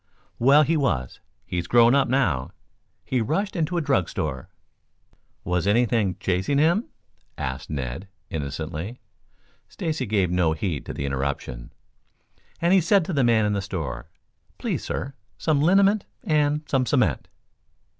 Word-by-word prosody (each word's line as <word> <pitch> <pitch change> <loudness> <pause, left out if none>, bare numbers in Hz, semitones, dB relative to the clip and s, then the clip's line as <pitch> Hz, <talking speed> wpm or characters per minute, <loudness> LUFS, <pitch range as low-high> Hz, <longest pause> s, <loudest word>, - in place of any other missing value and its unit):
"Well, 140 +5 +6
he 160 +3 +1
was 80 - -1 0.3
he's 85 -1 -3
grown 120 +4 +5
up 140 -1 +3
now. 105 - +1 0.6
He 130 -2 0
rushed 190 - -1
into 170 +1 -1
a - - +1
drug 95 - +1
store - - -4 0.5
" - - -40
"Was 90 +1 -1
anything 110 -4 +2
chasing 95 +10 0
him?" 170 +10 +3 0.5
asked 65 0 -4
Ned 70 +5 -4 0.2
innocently. 80 - -5 0.7
Stacy 155 -6 -3
gave 100 -4 +1
no 90 -3 +2
heed 80 -3 -3
to - - -4
the 70 - -3
interruption. 70 -3 -3 0.9
"And 170 +2 +3
he 190 - +6
said 180 +1 +3
to 185 - -3
the 140 -3 +2
man 115 -3 +4
in 105 - +1
the 100 - -1
store, 75 -10 -5 0.5
'Please, - - -2
sir, 140 - -4 0.2
some 150 -3 +1
liniment 195 +5 +4 0.2
and 150 -1 +1
some 130 -2 +1
cement?'" 110 - +1
115 Hz, 145 wpm, -24 LUFS, -, 0.9 s, Well